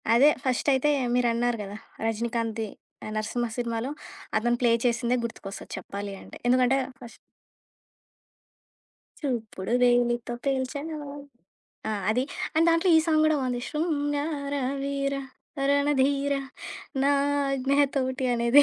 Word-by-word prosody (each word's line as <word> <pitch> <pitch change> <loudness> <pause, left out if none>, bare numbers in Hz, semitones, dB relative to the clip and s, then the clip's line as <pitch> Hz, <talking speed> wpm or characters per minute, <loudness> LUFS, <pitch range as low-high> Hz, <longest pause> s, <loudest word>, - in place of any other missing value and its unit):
అదే 275 +5 +7
ఫస్టయితే 265 +2 +2 0.2
మీరన్నారు 240 -1 +2
గదా! 200 +1 -7 0.3
'రజినీకాంత్‌ది' 225 -1 -1 0.5
నరసింహ 225 +2 -1
సినిమాలో, 235 +2 -2 0.5
అతను 240 +2 +2
ప్లే 240 -2 +4
చేసిందే 240 +1 +2
గుర్తుకొస్తది 200 -3 -7
చెప్పాలి 200 0 -5
అంటే. - - -11
ఎందుకంటే 255 +1 +4 0.2
ఫస్ 240 -2 -11 2.0
చూపుడు 225 -7 -3
వేలితో 240 -1 +2
పేల్చావా 285 +3 -2 0.8
ఆ! - - 0 0.2
అది. 245 +4 +2 0.3
అండ్ 325 +1 +5
దాంట్లో 330 +3 +3
ఈ - - +7
సాంగ్ 310 -2 +3
గూడా 310 0 +4
బావుంది. 250 -2 -1
శృంగార 290 -2 -1 0.3
వీర 275 0 -1 0.5
రణ 285 +1 +3
ధీర 280 +1 +2 0.7
నా 275 - +4 0.4
ఆజ్ఞ 270 0 0 0.2
తోటి 260 0 0
అనేది 235 +4 +6
255 Hz, 110 wpm, -27 LUFS, 235-280 Hz, 2.0 s, అదే